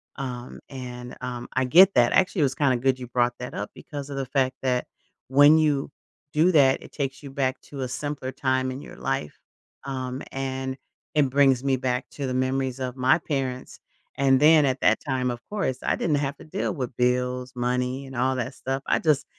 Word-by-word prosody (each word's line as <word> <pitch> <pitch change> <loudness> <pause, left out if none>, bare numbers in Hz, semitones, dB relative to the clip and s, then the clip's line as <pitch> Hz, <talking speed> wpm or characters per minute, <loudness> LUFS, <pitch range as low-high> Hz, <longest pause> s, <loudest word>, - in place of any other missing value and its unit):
um, 125 -3 -6
and 125 -2 -8
um, 125 -1 -5
I 130 0 +1
get 180 +9 +7
that 120 -1 +4
actually, 190 0 +2
it - - +5
was 135 -1 +1
kinda 135 -4 +2
good 130 +1 +1
you 125 - -7
brought 120 0 +1
that 125 - -6
up - - -4
because 145 -2 -8
of 140 - -5
the 135 - -2
fact 130 0 0
that 125 -1 +1 0.4
when 145 +4 +7
you 145 -3 +1 0.4
do 160 +4 +4
that, 135 -4 +5
it - - -13
takes 135 -2 -3
you 140 -2 -9
back 130 -1 -1
to 140 -2 -8
a 130 - -1
simpler 140 0 -4
time 130 -1 0
in 130 +2 -6
your - - -11
life, 75 - -3 0.5
um, 130 -1 -4
and 130 0 -3 0.4
it 145 -3 +3
brings 135 -2 +3
me 135 -1 +3
back 125 0 -1
to 140 -2 -4
the 130 - -2
memories 130 0 -1
of 130 -1 -3
my 130 +3 +4
parents, 135 -6 -4 0.4
and 135 -1 +4
then 155 +1 +6
at 130 -1 0
that - - +4
time, 130 -3 0
of 120 -1 -6
course, 195 -12 -2
I - - +1
didn't 155 - +1
have 140 0 -2
to - - -13
deal 185 +6 -2
with 130 -5 -5
bills, 125 +1 0
money, 125 +2 -1
and 135 -1 -10
all 130 +2 +1
that 130 +2 -3
stuff, 135 +1 -3
I - - +2
just 155 -3 +2
130 Hz, 210 wpm, -25 LUFS, 125-140 Hz, 0.5 s, get